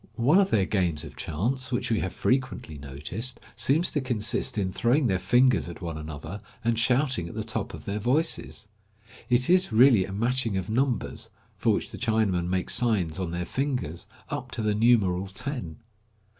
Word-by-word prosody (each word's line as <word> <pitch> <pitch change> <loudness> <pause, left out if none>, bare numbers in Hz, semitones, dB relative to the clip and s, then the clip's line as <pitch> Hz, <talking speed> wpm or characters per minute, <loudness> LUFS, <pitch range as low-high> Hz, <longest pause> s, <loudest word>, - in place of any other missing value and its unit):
One 140 +10 +4
of 195 -1 +3
their 100 -3 +3
games 90 -7 0
of - - -11
chance, 125 - -2
which 120 -1 -1
we 110 - +2
have 95 - -2
frequently 130 - -1
noticed, 75 - -5 0.2
seems 160 +6 +1
to 145 - 0
consist 115 -4 -1
in 95 -2 0
throwing 130 +4 +2
their 95 -6 +2
fingers 120 +2 +3
at 85 - -9
one 85 -3 -5
another, 80 +5 -7 0.2
and 115 -1 +1
shouting 125 - +2
at - - -10
the 110 - -2
top 110 -2 -4
of - - -12
their 100 +1 -2
voices. 130 0 0 0.6
It 125 +1 +3
is 185 -4 +3
really 115 -3 +6
a 95 - -8
matching 115 +1 0
of 95 +2 -3
numbers, 125 0 -1 0.3
for - - +2
which - - -2
the - - -7
Chinamen 110 -7 +1
make 95 0 -1
signs 95 -7 +2
on 90 -3 -2
their 85 +1 -3
fingers, 125 - -3 0.2
up - - -4
to 110 - -3
the 105 -1 +2
numeral 105 -5 +3
ten. 105 - -4
110 Hz, 185 wpm, -27 LUFS, 95-125 Hz, 0.6 s, really